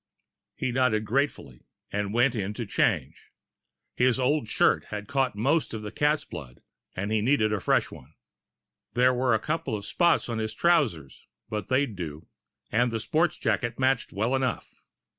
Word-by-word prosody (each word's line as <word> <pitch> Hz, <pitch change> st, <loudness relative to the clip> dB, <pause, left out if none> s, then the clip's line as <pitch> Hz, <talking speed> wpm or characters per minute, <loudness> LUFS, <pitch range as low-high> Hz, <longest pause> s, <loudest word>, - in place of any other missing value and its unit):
He 130 Hz, -, -2 dB
nodded 120 Hz, -4 st, +1 dB
gratefully, 120 Hz, -, -2 dB, 0.2 s
and 100 Hz, 0 st, -2 dB
went 120 Hz, +3 st, +3 dB
in 105 Hz, -2 st, -3 dB
to 120 Hz, -, -4 dB
change. -, -, -1 dB, 0.7 s
His 125 Hz, 0 st, +2 dB
old 135 Hz, 0 st, +1 dB
shirt -, -, +3 dB
had 105 Hz, 0 st, -6 dB
caught 135 Hz, -4 st, 0 dB
most 130 Hz, +3 st, +1 dB
of 110 Hz, -, -6 dB
the 105 Hz, -, -6 dB
cat's 150 Hz, +5 st, +1 dB
blood, 65 Hz, -3 st, -10 dB, 0.3 s
and 100 Hz, +3 st, -3 dB
he 110 Hz, -1 st, +2 dB
needed 110 Hz, -3 st, +2 dB
a 105 Hz, -, 0 dB
fresh -, -, +1 dB
one. 70 Hz, +5 st, -13 dB, 0.8 s
There 125 Hz, +1 st, +4 dB
were 125 Hz, -2 st, +2 dB
a -, -, +1 dB
couple 150 Hz, -5 st, -2 dB
of 100 Hz, -, -8 dB
spots 170 Hz, -, +2 dB
on 115 Hz, -2 st, -3 dB
his 110 Hz, 0 st, -3 dB
trousers, 125 Hz, -, +1 dB, 0.2 s
but 105 Hz, -3 st, -4 dB
they'd 130 Hz, -4 st, +1 dB
do. 80 Hz, -3 st, -6 dB, 0.5 s
And 120 Hz, +3 st, +2 dB
the 115 Hz, -1 st, -2 dB
sports 160 Hz, +9 st, +1 dB
jacket 120 Hz, +1 st, -1 dB
matched 130 Hz, -2 st, +1 dB
well 110 Hz, +6 st, -1 dB
enough. 130 Hz, -2 st, -1 dB
115 Hz, 170 wpm, -27 LUFS, 105-130 Hz, 0.8 s, There